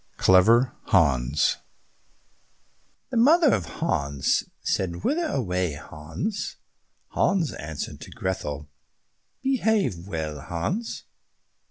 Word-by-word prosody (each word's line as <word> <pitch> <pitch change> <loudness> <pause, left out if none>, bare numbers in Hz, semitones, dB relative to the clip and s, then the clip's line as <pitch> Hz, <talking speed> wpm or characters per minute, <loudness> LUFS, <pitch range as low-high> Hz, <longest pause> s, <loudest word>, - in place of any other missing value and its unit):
32 - - -14
Clever 115 +7 +5
Hans 70 -5 +3 1.5
The 250 - -1
mother 300 +5 +6
of - - 0
Hans 70 - 0 0.2
said, 85 -2 -1
"Whither 330 +2 +1
away, 90 - -1
Hans?" 80 - -5 0.5
Hans 180 -6 +1
answered, 75 0 -6
"To - - -9
Grethel." 75 -6 -4 0.8
"Behave 220 - +1
well, 80 -5 -4
Hans." 135 - -3
95 Hz, 90 wpm, -25 LUFS, -, 1.5 s, mother